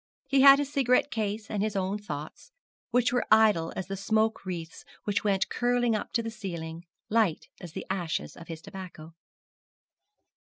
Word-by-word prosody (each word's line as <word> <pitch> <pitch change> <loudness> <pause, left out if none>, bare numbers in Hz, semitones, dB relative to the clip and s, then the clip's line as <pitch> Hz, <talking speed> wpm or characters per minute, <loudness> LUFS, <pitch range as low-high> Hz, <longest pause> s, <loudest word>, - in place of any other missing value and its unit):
He 270 0 +3
had 275 0 +10
his 285 0 -3
cigarette 260 +1 +3
case 215 0 -2
and 205 - -2
his 215 0 -1
own 195 +2 -1
thoughts, 155 - -7 0.4
which 245 0 +2
were 245 - +1
idle 210 -7 +5
as 190 - -3
the 195 +1 -4
smoke 220 +1 0
wreaths 170 -3 -6 0.2
which 205 -1 -1
went 195 -2 +1
curling 245 -1 +1
up 215 - -4
to 230 - +1
the 225 - -4
ceiling, 170 -5 -6 0.2
light 215 -7 +1
as 175 -4 -9
the - - -6
ashes 175 -4 -3
of 170 - -12
his 165 -1 -8
tobacco. 175 -4 -9
205 Hz, 170 wpm, -28 LUFS, 175-230 Hz, 0.4 s, had